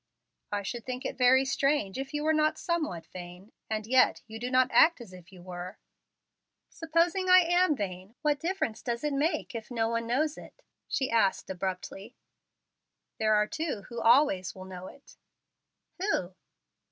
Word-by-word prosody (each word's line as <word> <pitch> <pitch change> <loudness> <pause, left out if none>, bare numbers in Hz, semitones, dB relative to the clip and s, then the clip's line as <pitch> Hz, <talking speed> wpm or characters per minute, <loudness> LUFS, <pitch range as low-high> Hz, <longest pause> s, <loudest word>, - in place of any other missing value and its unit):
"I 205 -1 -2
should 235 +3 -5
think 255 +1 -5
it - - -3
very 260 +1 +5
strange 275 -5 0
if 270 0 -5
you 295 0 -2
were 315 +1 +3
not 310 0 +2
somewhat 310 - -2
vain. 180 +3 -10 0.2
And 215 -1 -2
yet 255 +3 +3
you 220 0 -9
do 245 +2 -3
not 255 0 +3
act 330 -1 +5
as 225 -6 -11
if 180 +1 -14
you 180 -2 -14
were." 180 +2 -7 0.9
"Supposing 335 +3 0
I 365 0 +9
am 350 -1 +3
vain. 190 -1 -6
What 295 -1 +2
difference 335 - -2
does 235 0 -3
it 295 -1 0
make, 285 0 -1
if 225 -2 -6
no 225 -2 0
one 230 0 -2
knows 290 +6 0
it?" - - -15 0.2
she 265 -2 -1
asked 210 -4 +1
abruptly. 190 +4 -5 1.0
"There 215 -1 +3
are 210 0 +3
two 310 -6 -4
who 235 -1 -5
always 230 -6 +3
will 185 0 -9
know 185 0 -8
it." 280 - -16 0.8
"Who?" 275 - -1
240 Hz, 170 wpm, -29 LUFS, 195-300 Hz, 1.0 s, I